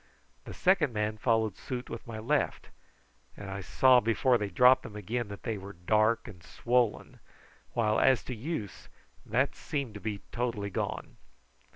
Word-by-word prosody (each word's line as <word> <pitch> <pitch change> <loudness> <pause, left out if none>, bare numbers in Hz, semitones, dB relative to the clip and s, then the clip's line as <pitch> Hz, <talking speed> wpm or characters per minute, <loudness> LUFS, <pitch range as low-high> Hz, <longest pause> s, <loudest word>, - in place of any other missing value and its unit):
The - - -8
second 180 -8 +3
man 105 0 -2
followed 110 -3 +1
suit 125 -1 -5
with 115 - -8
my 115 -1 -6
left, 140 +7 -1 0.7
and 100 -1 -7
I 100 +1 -4
saw 130 +6 +5
before 120 +2 +2
they 105 -1 -2
dropped 125 +7 +6
them 105 - -10
again 110 +3 -3
that 100 0 -9
they 110 -4 -3
were 100 +1 -9
dark 110 +6 +1
and 95 -6 -11
swollen, 120 +7 -1 0.5
while 110 -2 +2
as 130 -3 +4
to 130 - -5
use, 115 - -5 0.4
that - - +1
seemed 140 -7 -4
to 105 - -8
be 105 -3 -4
totally 115 -5 -2
gone. - - -4
110 Hz, 165 wpm, -30 LUFS, 105-125 Hz, 0.7 s, dropped